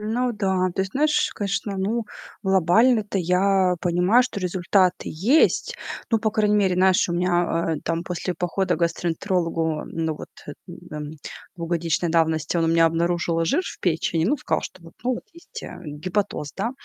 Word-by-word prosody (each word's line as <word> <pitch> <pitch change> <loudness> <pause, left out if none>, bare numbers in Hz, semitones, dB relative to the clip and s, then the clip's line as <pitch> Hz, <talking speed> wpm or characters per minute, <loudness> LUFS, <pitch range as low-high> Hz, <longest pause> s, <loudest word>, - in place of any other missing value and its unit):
Ну 235 +4 -1
да, 190 -3 0
то 190 - -2
есть, 190 0 -6
знаешь, 300 +1 +2
конечно, 200 0 -2
ну, 220 +5 -1 0.4
глобально-то 200 +4 +3
я 185 +1 +2
понимаю, 180 +7 +3
что 250 -4 -4
результаты 185 0 +1
есть. 250 - +2 0.4
Ну, 225 -2 +2
по 220 - +1
крайней 210 -1 +2
мере, 195 -3 +3
знаешь, 185 0 +4
у 170 - -1
меня, 175 -2 +1
э, - - -13
там 165 +1 -2
после 180 +1 -3
похода 180 0 -1
к - - -9
гастроэнтерологу, 165 -2 -1
ну, 160 -1 -2
вот, - - -9 0.2
э, - - -6 0.4
эм, 150 -1 -5 0.5
двухгодичной 170 0 -1
давности 160 0 +1
он 165 - +2
у - - +1
меня 165 0 +5
обнаружил 170 0 0
жир 285 - +1
в - - -8
печени, 165 -1 0
ну, 265 - +2
сказал, 255 - -1
что 185 - -9
вот, 165 - -13
ну, 250 +2 +1
вот - - -8
есть, 340 +2 -10
э, - - -9
гепатоз, 150 0 -3
да. 225 +5 -1
180 Hz, 175 wpm, -23 LUFS, 165-205 Hz, 0.5 s, меня